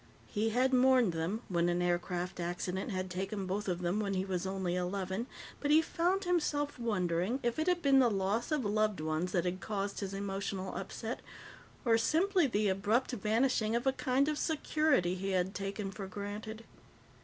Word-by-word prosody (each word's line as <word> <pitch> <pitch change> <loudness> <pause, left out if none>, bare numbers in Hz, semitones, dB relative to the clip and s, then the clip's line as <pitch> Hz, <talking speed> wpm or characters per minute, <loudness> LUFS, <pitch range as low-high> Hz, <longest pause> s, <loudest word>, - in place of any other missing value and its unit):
He 215 +2 0
had 255 +4 +2
mourned 255 -6 +5
them 170 +8 -2
when 175 -1 +1
an 175 0 +1
aircraft 175 0 -1
accident 180 +3 -2
had 185 -2 -2
taken 190 +2 -3
both 200 +3 -2
of 180 -1 -2
them 175 +4 +1
when 200 -2 -1
he 185 0 0
was 190 -1 -2
only 190 -2 -1
eleven, 190 +4 -2 0.3
but 290 - -2
he 305 +2 +7
found 350 +4 +1
himself 300 -6 0
wondering 195 0 0
if 240 +4 0
it 315 - 0
had 360 -1 +2
been 275 -1 +6
the 250 -2 +5
loss 200 +6 0
of 295 -6 +1
loved 215 -2 +1
ones 155 +3 -1
that 175 -1 +1
had 180 +1 -1
caused 200 -1 -3
his 195 -1 -4
emotional 195 -1 -3
upset 225 +5 -4 0.7
or 230 -1 +4
simply 345 +6 +3
the 210 -3 +1
abrupt 210 +7 +1
vanishing 225 0 +1
of 240 - 0
a 265 - +3
kind 265 +1 +1
of 305 -1 -1
security 305 - +2
he 195 +1 -2
had 185 +1 +1
taken 195 0 -4
for 195 -1 -6
granted. 210 +3 -6
205 Hz, 185 wpm, -33 LUFS, 185-250 Hz, 0.7 s, he